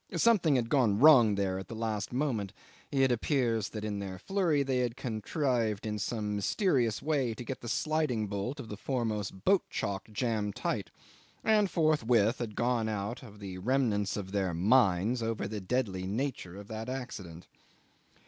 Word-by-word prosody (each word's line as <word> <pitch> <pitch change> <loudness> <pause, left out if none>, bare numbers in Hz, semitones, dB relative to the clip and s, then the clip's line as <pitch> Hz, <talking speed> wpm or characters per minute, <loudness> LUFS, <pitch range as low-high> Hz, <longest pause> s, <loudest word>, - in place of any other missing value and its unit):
Something 195 -11 +4
had 120 -3 +1
gone 120 -8 +3
wrong 120 -6 +7
there 95 -1 -1
at 95 - -8
the 115 - -7
last 110 -2 -2
moment. 120 -7 -1 0.4
It 135 -2 +3
appears 120 -4 +1
that 105 -1 -5
in 105 -1 -3
their 95 -2 -5
flurry 165 - +1
they 130 -2 0
had 120 0 -1
contrived 115 -2 -1
in 105 -1 -2
some 105 -1 -2
mysterious 120 - +1
way 140 -7 0
to 120 - -7
get 130 +2 -6
the 120 - -6
sliding 155 -8 0
bolt 100 +8 -4
of 125 - -7
the 105 - -7
foremost 105 -6 -3
boat 195 -1 +5
chock 100 +1 -3
jammed 105 -3 -1
tight, - - -2 0.5
and 210 -2 +3
forthwith 125 - +2
had 110 -4 -4
gone 120 -2 +1
out 105 +4 -3
of 105 -5 -12
the 95 -3 -7
remnants 105 -3 +1
of 95 -2 -5
their 95 -4 0
minds 105 +3 +3
over 115 -1 -2
the 105 -1 -5
deadly 95 -4 -1
nature 110 -4 -3
of 100 0 -10
that 110 +2 -5
accident. 95 -10 -6
115 Hz, 170 wpm, -30 LUFS, 100-130 Hz, 0.5 s, wrong